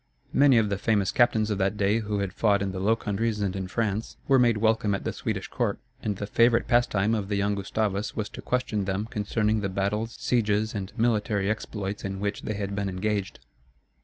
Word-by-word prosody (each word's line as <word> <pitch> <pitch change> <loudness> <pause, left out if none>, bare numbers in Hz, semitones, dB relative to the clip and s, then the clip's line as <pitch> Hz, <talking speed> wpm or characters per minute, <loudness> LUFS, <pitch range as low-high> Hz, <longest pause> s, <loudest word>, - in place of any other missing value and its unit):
Many 140 -3 +6
of 110 -2 +3
the 100 -1 -2
famous 100 -4 +1
captains 110 -3 +3
of 100 - -1
that 95 +2 +1
day 105 +2 +2
who 105 -2 -2
had 100 -1 -3
fought 100 -2 +2
in 95 - -2
the 95 - -5
Low 105 +4 +3
Countries 105 0 -2
and 100 -2 -1
in 95 -1 -3
France, 110 +1 -2
were 135 -1 +5
made 120 -3 +4
welcome 110 -2 +2
at - - -5
the - - -2
Swedish - - -3
court; - - -1 0.2
and 105 -2 -1
the 100 - -3
favorite 115 +3 +3
pastime 115 -4 +2
of 105 -3 -2
the 105 - 0
young 100 +1 +1
Gustavus 100 +1 -2
was 105 -2 -2
to - - -9
question 115 -5 -1
them 95 +2 -1
concerning 110 0 0
the 100 - -1
battles, 105 +4 -2
sieges, 110 -2 +1
and 100 -2 -4
military 105 -3 +1
exploits 105 -2 -4
in 95 -1 -4
which 100 +1 -2
they 110 - -3
had 100 -1 -3
been 100 -1 -1
engaged. 100 +1 -2
105 Hz, 215 wpm, -26 LUFS, 100-110 Hz, 0.2 s, Many